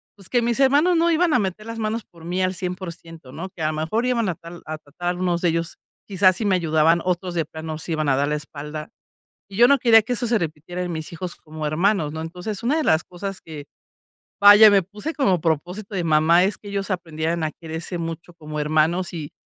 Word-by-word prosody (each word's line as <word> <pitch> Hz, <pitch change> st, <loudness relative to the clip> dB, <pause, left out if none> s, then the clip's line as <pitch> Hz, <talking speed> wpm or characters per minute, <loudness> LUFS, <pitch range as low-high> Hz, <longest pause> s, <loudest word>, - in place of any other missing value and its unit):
pues, 195 Hz, -3 st, -11 dB
que 245 Hz, -, +2 dB
mis 235 Hz, +1 st, 0 dB
hermanos 290 Hz, +7 st, +4 dB
no 340 Hz, +1 st, +3 dB
iban 335 Hz, 0 st, +2 dB
a 250 Hz, -, +4 dB
meter 200 Hz, +1 st, -3 dB
las 230 Hz, 0 st, -6 dB
manos 220 Hz, +1 st, -2 dB
por 170 Hz, -2 st, -17 dB
mí 180 Hz, +2 st, -2 dB
al 185 Hz, 0 st, +1 dB
100%, 170 Hz, -6 st, -7 dB
¿no?, 185 Hz, +4 st, -6 dB
que 180 Hz, -, -12 dB
a 155 Hz, 0 st, +1 dB
mejor 160 Hz, +10 st, -1 dB
iban 235 Hz, -5 st, +1 dB
a 175 Hz, -, -2 dB
tal 170 Hz, +2 st, -11 dB
a 155 Hz, 0 st, -5 dB
tratar 175 Hz, +5 st, -4 dB
unos 175 Hz, -1 st, 0 dB
de 175 Hz, -, +2 dB
ellos, 165 Hz, 0 st, -2 dB, 0.3 s
quizás, 185 Hz, -2 st, +3 dB
sí 220 Hz, -, -3 dB
me 195 Hz, -2 st, +3 dB
ayudaban, 165 Hz, -1 st, +3 dB
otros 180 Hz, 0 st, -1 dB
de 165 Hz, -, +1 dB
plano 160 Hz, +1 st, -7 dB
nos 155 Hz, -, -5 dB
iban 155 Hz, -2 st, -1 dB
a 135 Hz, -, +3 dB
dar 140 Hz, +2 st, 0 dB
la 150 Hz, -, 0 dB
espalda. 150 Hz, +1 st, -7 dB, 0.6 s
Y 195 Hz, -, -9 dB
yo 240 Hz, +1 st, +7 dB
no 280 Hz, -, +5 dB
quería 225 Hz, -2 st, +6 dB
que 245 Hz, -, -2 dB
eso 240 Hz, +1 st, 0 dB
se 230 Hz, 0 st, +3 dB
repitiera 165 Hz, +2 st, -5 dB
en 180 Hz, -, -4 dB
mis 160 Hz, -1 st, -5 dB
hijos 180 Hz, +1 st, -5 dB
como 155 Hz, -1 st, -6 dB
hermanos, 165 Hz, 0 st, +1 dB
¿no? 160 Hz, -, -5 dB
Entonces, 180 Hz, +6 st, -5 dB
una 270 Hz, +7 st, +1 dB
de 315 Hz, -, 0 dB
las 160 Hz, +1 st, +3 dB
cosas 195 Hz, +2 st, -7 dB
que, 150 Hz, -3 st, -9 dB, 0.8 s
vaya, 205 Hz, +1 st, +9 dB
me 200 Hz, -1 st, +4 dB
puse 210 Hz, -, -6 dB
como 195 Hz, -, +2 dB
propósito 180 Hz, +6 st, -2 dB
de 180 Hz, -3 st, -1 dB
mamá 165 Hz, +3 st, +4 dB
es 200 Hz, +2 st, 0 dB
que 205 Hz, -, -12 dB
ellos 200 Hz, 0 st, -3 dB
aprendieran 165 Hz, -2 st, -2 dB
a 155 Hz, -, -2 dB
quererse 165 Hz, +2 st, -6 dB
mucho 165 Hz, +1 st, -6 dB
como 155 Hz, -2 st, -7 dB
hermanos, 155 Hz, +4 st, +1 dB
y 155 Hz, -4 st, -6 dB
175 Hz, 235 wpm, -22 LUFS, 160-205 Hz, 0.8 s, vaya